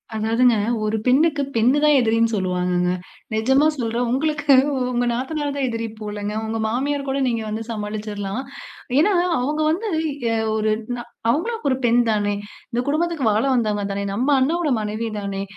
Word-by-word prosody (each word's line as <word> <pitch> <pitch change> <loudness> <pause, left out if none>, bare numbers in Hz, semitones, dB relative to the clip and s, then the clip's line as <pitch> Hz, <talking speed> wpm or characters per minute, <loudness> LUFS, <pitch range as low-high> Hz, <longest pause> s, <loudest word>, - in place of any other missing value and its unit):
அதாவதுங்க. 230 +2 +3 0.3
ஒரு 215 +1 0
பெண்ணுக்கு 295 +3 +3
பெண் 235 +4 +4
தான் 300 -1 +5
எதிரின்னு 230 -1 +2
சொல்லுவாங்கங்க. 180 -1 0 0.4
நிஜமா 265 +7 +3
சொல்றேன், 235 0 -1
உங்களுக்கு 295 +1 +2 0.4
உங்க 245 0 0
நாத்தனார் 285 +4 -2
தான் 265 -2 0
எதிரி 230 0 -3
போலங்க 210 0 -4
உங்க 225 0 -3
மாமியார் 275 +4 -1
கூட 275 +1 0
நீங்க 230 -2 -1
வந்து 220 +1 -3
சமாளிச்சுர்லாம். 210 0 -4 0.6
ஏன்னா, 405 +6 +4 0.3
அவுங்க 295 +5 -1
வந்து, 425 +7 -2 0.4
எ - - +1 0.2
ஒரு 215 0 +1 0.3
நா 240 - -5 0.3
அவுங்களும் 445 - -2
ஒரு 260 - +2
பெண் 240 +1 +4
தானே? 205 -1 0 0.4
இந்த 240 +1 0
குடும்பத்துக்கு 320 -2 0
வாழ 215 +4 +1
வந்தவங்க 210 -3 0
தானே? 200 0 -3
நம்ம 245 +8 0
அண்ணாவோட 315 +4 +1
மனைவி 215 +2 -3
தானே? 195 0 -3
235 Hz, 155 wpm, -22 LUFS, 215-280 Hz, 0.6 s, தான்